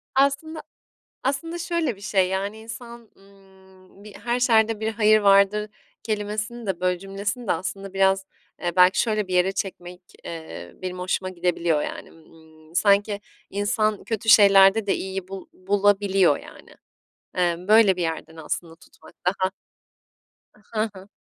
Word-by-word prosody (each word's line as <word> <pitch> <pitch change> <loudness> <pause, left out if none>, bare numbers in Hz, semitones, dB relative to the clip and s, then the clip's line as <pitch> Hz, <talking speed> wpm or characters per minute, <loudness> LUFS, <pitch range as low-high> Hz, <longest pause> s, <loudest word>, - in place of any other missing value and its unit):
Aslında, 290 +4 +1 0.6
aslında 305 +6 -2
şöyle 335 - -1
bir - - -17
şey 195 -3 +1
yani 200 +3 -3
insan, 235 0 -10
ımm, 190 0 -21
bir 210 -2 -12
"her 240 +1 -2
şerde 225 -3 +3
bir 220 0 -1
hayır 215 0 +4
vardır" 200 +1 +4 0.3
kelimesini 215 +2 -4
de, 190 -3 -2
böyle, 180 -1 +1
cümlesini 200 +5 -5
de - - +4
aslında 195 +3 -5
biraz, 195 0 +2 0.4
eee, 175 0 -2
belki 180 +1 +5
şöyle 215 -4 0
bir 185 - -3
yere 180 +2 +3
çekmek, 180 -2 -6 0.2
eee, 165 -1 -8
benim 185 0 -5
hoşuma 185 +1 -2
gidebiliyor 170 -3 0
yani, - - -6
ımm, 160 0 -20
sanki 200 +2 +2 0.3
insan 210 +1 0
kötü 225 -1 -4
şeylerde 200 -1 +7
de 195 - +2
iyiyi 190 -1 -5
bul 195 -1 -8
bulabiliyor 195 -3 +2
yani. - - -14 0.7
Eee, 175 -1 +2
böyle 215 -3 +6
bir 180 - -4
yerden 160 -1 -4
aslında 165 +1 -5
tutmak 170 - -19
daha 185 +1 0 1.0
A 215 - -24 0.2
Hı 220 - 0
hı. 190 +1 -12
195 Hz, 145 wpm, -24 LUFS, 185-215 Hz, 1.0 s, şeylerde